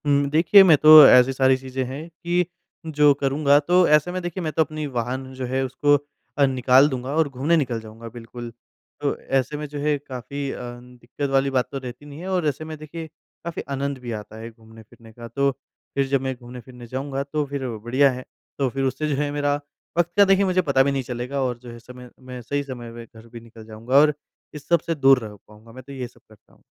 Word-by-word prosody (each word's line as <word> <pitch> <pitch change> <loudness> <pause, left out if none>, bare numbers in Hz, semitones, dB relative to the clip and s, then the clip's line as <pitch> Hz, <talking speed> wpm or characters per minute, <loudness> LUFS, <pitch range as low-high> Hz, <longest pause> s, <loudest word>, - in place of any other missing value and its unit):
हुँ, 140 -1 +2
देखिए, 165 +6 +6
मैं 165 -5 +6
तो 155 +2 +6 0.2
ऐसी 125 +1 +6
सारी 130 0 +3
चीज़ें 130 0 -4
हैं 140 +6 -7
कि 175 +1 -1 0.4
जो 150 -2 +4
करूँगा, 140 +1 +2
तो 175 +4 +3
ऐसे 150 +3 +3
में, 185 0 -4
देखिए, 175 +1 -5
मैं 155 - -2
तो 160 - +2
अपनी 155 0 -6
वाहन 130 +3 -3
जो 130 0 -5
है, 130 +2 -1
उसको 145 +3 +2 0.4
अ, 140 - +5
निकाल 130 +1 +4
दूँगा 130 +1 -4
और 160 -2 +2
घूमने 140 +5 0
निकल 125 -6 -1
जाऊँगा, 110 +1 -11
बिल्कुल। 120 +1 -9 0.5
तो - - 0 0.2
ऐसे 135 +3 -4
में 150 - -5
जो 145 0 -7
है, 150 0 +1
काफ़ी 140 +1 -6
अ, - - -7 0.2
दिक्कत 125 +3 -7
वाली 135 0 +2
बात 130 -2 0
तो 140 - -4
रहती 130 +1 -9
नहीं 145 +1 -11
है 180 - -7
और 180 -4 0
ऐसे 150 +2 -3
में, 155 0 -7
देखिए, 160 +2 -8 0.4
काफ़ी 170 -1 -5
आनंद 140 0 -2
भी 120 -1 -7
आता 105 +1 -14
है 115 +1 -8
घूमने-फिरने 110 0 -17
का। 115 +1 -10
तो 140 +3 0 0.4
फिर 140 -1 +1
जब 135 -1 0
मैं 130 -1 -3
घूमने-फिरने 125 0 -12
जाऊँगा, 135 +2 -4
तो 150 +1 -2
फिर 140 -2 -5
बढ़िया 130 +6 +2
है। 130 0 -8 0.3
तो 135 -2 +1
फिर 135 +2 -3
उससे 135 +3 -1
जो 145 - 0
है, 145 -1 -2
मेरा 145 0 0 0.4
वक़्त 175 0 +1
का 200 - +7
देखिए, 195 0 +3
मुझे 185 -1 +2
पता 140 -6 +2
भी 140 - 0
नहीं 135 -1 -2
चलेगा 125 +3 -4
और 125 -2 -2
जो 120 0 -12
है, 115 - -11
समय 125 +1 -13
मैं 130 -1 -9
सही 145 +4 -3
समय 120 -4 -8
में 115 0 -10
घर 110 0 -17
भी 115 0 -11
निकल 115 -1 -15
जाऊँगा 115 +4 -5
और 150 0 +4 0.4
इस 150 -2 -11
सब 170 -1 +3
से 165 - 0
दूर 135 -2 +5
रह 105 - -12
पाऊँगा। 110 +2 -17
मैं 130 +2 -12
तो 140 - -13
ये 130 -2 -5
सब - - -23
करता 110 -2 -22
हूँ। - - -26
135 Hz, 235 wpm, -23 LUFS, 125-150 Hz, 0.5 s, का